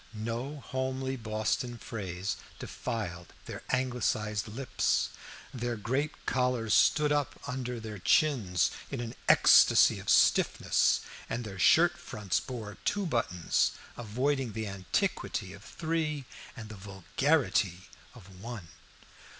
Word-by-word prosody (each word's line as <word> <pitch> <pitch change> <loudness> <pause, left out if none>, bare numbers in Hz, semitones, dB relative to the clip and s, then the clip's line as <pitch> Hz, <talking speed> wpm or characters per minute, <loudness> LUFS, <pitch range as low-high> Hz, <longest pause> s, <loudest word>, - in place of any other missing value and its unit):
No 120 +7 -4
homely 130 0 -3
Boston 110 +1 -2
phrase 95 -4 -4 0.2
defiled 90 -7 -5
their - - -7
anglicized 115 -4 0
lips, 125 +5 0 0.4
their 120 -2 -2
great 130 +7 -2
collars 125 -4 +1
stood 150 -1 +4
up 145 -3 0
under 125 -2 -4
their 110 -2 -7
chins 95 - +2 0.2
in 135 - -4
an 115 -1 -4 0.2
ecstasy - - +7
of - - -6
stiffness, - - +4 0.3
and 120 +2 -2
their 95 -4 -8
shirt - - +5
fronts 100 -4 -2
bore 115 -6 -7
two 205 -1 0
buttons, 115 - +1 0.2
avoiding 125 +2 -1
the 110 -1 -3
antiquity 95 -1 -2
of 100 0 -13
three 155 -3 -2 0.3
and 110 -2 -8
the 110 - -8
vulgarity 100 - 0 0.3
of 95 -5 -14
one. 115 -7 -7
115 Hz, 120 wpm, -30 LUFS, 100-130 Hz, 0.4 s, ecstasy